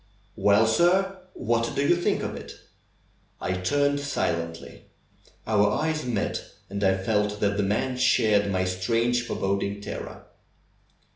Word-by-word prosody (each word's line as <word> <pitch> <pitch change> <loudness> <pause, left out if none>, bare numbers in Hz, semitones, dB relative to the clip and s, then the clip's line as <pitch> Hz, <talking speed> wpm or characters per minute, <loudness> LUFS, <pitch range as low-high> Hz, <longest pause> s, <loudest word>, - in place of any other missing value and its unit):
"Well, 105 +2 +4
sir, 185 +10 +2 0.2
what 115 +1 -1
do 140 - +1
you 175 - +5
think 175 - 0
of - - -4
it?" - - -9 0.8
I 90 - -2
turned 145 +10 +1
silently. 85 -12 -3 0.6
Our 105 -2 +3
eyes 155 +4 -1
met 110 -4 -1 0.3
and 100 +1 -3
I 95 0 +3
felt 105 +1 0
that 100 -1 +1
the 100 - +1
man 105 +6 0
shared 110 -5 +3
my 95 -1 0
strange 115 +7 +1
foreboding 100 +1 -1
terror. 100 - -7
105 Hz, 135 wpm, -26 LUFS, 100-130 Hz, 0.8 s, you